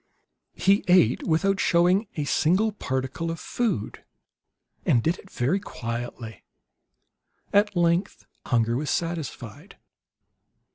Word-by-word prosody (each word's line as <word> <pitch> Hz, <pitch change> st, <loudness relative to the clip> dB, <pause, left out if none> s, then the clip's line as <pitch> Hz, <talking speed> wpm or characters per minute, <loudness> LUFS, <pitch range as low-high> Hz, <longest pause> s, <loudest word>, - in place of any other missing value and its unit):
He 195 Hz, +1 st, +3 dB
ate 180 Hz, -10 st, +4 dB
without 195 Hz, +4 st, +1 dB
showing 180 Hz, +5 st, +3 dB
a 150 Hz, -, -2 dB
single 185 Hz, +9 st, +2 dB
particle 130 Hz, -2 st, -3 dB
of 165 Hz, 0 st, -4 dB
food, 215 Hz, -, -3 dB, 0.8 s
and 120 Hz, -3 st, +2 dB
did 170 Hz, +3 st, 0 dB
it 195 Hz, -, -16 dB
very 140 Hz, +9 st, 0 dB
quietly. 115 Hz, -, -6 dB, 1.1 s
At 205 Hz, 0 st, +3 dB
length 175 Hz, +2 st, 0 dB, 0.2 s
hunger 115 Hz, -1 st, +1 dB
was 145 Hz, +4 st, -2 dB
satisfied. 160 Hz, -, -4 dB
165 Hz, 105 wpm, -25 LUFS, 125-190 Hz, 1.1 s, ate